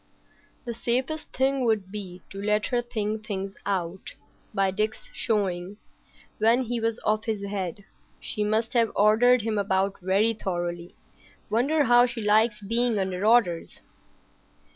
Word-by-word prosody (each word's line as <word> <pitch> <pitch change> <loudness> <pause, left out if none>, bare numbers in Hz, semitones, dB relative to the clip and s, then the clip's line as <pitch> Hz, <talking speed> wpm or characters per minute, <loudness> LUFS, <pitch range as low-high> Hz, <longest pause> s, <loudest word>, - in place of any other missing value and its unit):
"The 235 - -3
safest 255 +7 +1
thing 265 0 +1
would 215 -5 0
be 185 -3 -7
to 195 - -7
let 210 +1 +1
her 240 - +3
think 215 -2 -3
things 195 -2 -4
out. 185 -2 -3 0.4
By 195 -1 +1
Dick's 215 +2 -3
showing,—when 210 +3 -2
he 240 0 -2
was 230 0 -1
off 215 0 +1
his 215 -3 -2
head,—she 200 +2 -6
must 220 +3 0
have 230 -2 +3
ordered 225 +3 +4
him 215 -2 -1
about 195 0 0
very 195 +5 +2
thoroughly. 175 -4 -4 0.6
Wonder 280 +8 +2
how 245 -1 +5
she 240 -1 -6
likes 215 0 +2
being 230 +2 0
under 190 -1 -2
orders." 210 -7 +2
215 Hz, 135 wpm, -26 LUFS, 195-235 Hz, 0.6 s, how